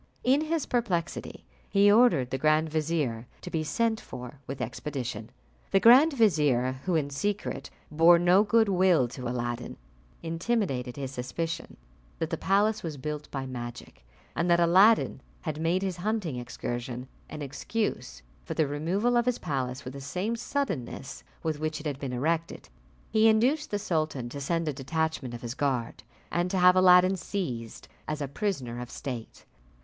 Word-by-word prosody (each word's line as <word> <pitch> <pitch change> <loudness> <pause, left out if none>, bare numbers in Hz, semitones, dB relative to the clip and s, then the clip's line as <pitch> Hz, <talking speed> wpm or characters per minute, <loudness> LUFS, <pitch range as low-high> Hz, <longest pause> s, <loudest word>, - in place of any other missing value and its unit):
In 265 +4 +4
his 320 -1 -1
perplexity 190 -9 -2 0.2
he 200 0 +5
ordered 210 - +4
the 135 - -2
grand 155 +2 +3
vizier 150 -7 -1
to 180 - -8
be 160 -1 -1
sent 220 +7 0
for 125 +2 -9
with 135 0 -5
expedition. 120 -2 -4 0.4
The 195 - +4
grand 260 +9 +7
vizier, 145 - +2
who, 180 -2 +1
in 145 -3 0
secret, 205 +9 -3 0.2
bore 165 +3 +6
no 175 +3 +5
good 220 +1 +3
will 180 -8 +3
to 125 0 -6
Aladdin, 120 -1 -4 0.5
intimated 165 - -1
his 135 -2 -5
suspicion 165 +6 -4 0.4
that 160 +1 -3
the - - +1
palace 205 +4 +2
was 160 -4 -5
built 150 +2 -5
by 135 -1 -4
magic, 120 - -8 0.3
and 170 +1 0
that 170 0 +5
Aladdin 190 +6 +5 0.2
had 155 -2 -4
made 175 +4 +1
his 185 -3 -2
hunting 190 - -2
excursion 120 0 -5 0.2
an 150 -1 -6
excuse 145 - -3 0.2
for - - -5
the 155 - +3
removal 175 - 0
of 240 0 +2
his 250 - +2
palace 130 -4 -3
with 125 - -6
the 140 - -8
same 185 +11 -2
suddenness 185 - -4 0.2
with 155 -2 -2
which 155 0 -2
it 150 - -11
had 145 -3 -3
been 135 -3 -4
erected. 160 +6 -2 0.4
He 220 0 +5
induced 255 +8 +2
the 205 - -1
sultan 155 - -2
to 140 +3 -7
send 165 +3 -1
a 150 - 0
detachment 140 -2 -2
of 120 - -10
his 120 0 -4
guard, 130 -4 -2 0.3
and 175 +1 0
to 190 - -1
have 180 0 +6
Aladdin 185 +1 +6
seized 130 - -5 0.2
as 155 0 -3
a 145 - -2
prisoner 135 - -3
of 125 - -7
state. 120 -3 -7
160 Hz, 165 wpm, -28 LUFS, 130-195 Hz, 0.5 s, grand